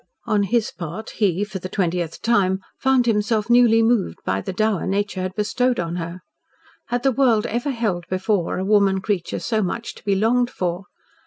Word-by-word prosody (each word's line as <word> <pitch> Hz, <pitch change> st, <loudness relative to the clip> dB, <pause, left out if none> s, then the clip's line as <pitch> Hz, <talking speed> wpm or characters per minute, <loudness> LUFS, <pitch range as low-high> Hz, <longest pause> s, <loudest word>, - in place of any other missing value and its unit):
On 215 Hz, -3 st, +2 dB
his 215 Hz, +3 st, 0 dB
part, 170 Hz, +5 st, -7 dB
he 200 Hz, -2 st, +1 dB
for 205 Hz, -2 st, -5 dB
the 185 Hz, -, -6 dB
twentieth 175 Hz, -3 st, -2 dB
time 190 Hz, -5 st, +2 dB, 0.2 s
found 265 Hz, -2 st, +3 dB
himself 215 Hz, 0 st, +1 dB
newly 235 Hz, -2 st, +5 dB
moved 225 Hz, -, +1 dB
by 95 Hz, 0 st, 0 dB
the -, -, -4 dB
dower 215 Hz, -1 st, 0 dB
nature 200 Hz, -1 st, -1 dB
had 185 Hz, 0 st, -4 dB
bestowed 245 Hz, +4 st, 0 dB
on 170 Hz, 0 st, -2 dB
her. 170 Hz, +1 st, -5 dB, 0.7 s
Had 245 Hz, 0 st, -2 dB
the 270 Hz, -, +4 dB
world 240 Hz, -5 st, +3 dB
ever 240 Hz, +6 st, -2 dB
held 210 Hz, -9 st, -2 dB
before 185 Hz, -1 st, 0 dB
a 185 Hz, -, -2 dB
woman 200 Hz, -2 st, +3 dB
creature 190 Hz, -4 st, -2 dB
so 220 Hz, -2 st, -1 dB
much 225 Hz, +5 st, -3 dB
to -, -, -16 dB
be 200 Hz, -1 st, +1 dB
longed 240 Hz, +4 st, +2 dB
for? 180 Hz, -4 st, -3 dB
205 Hz, 185 wpm, -22 LUFS, 185-230 Hz, 0.7 s, newly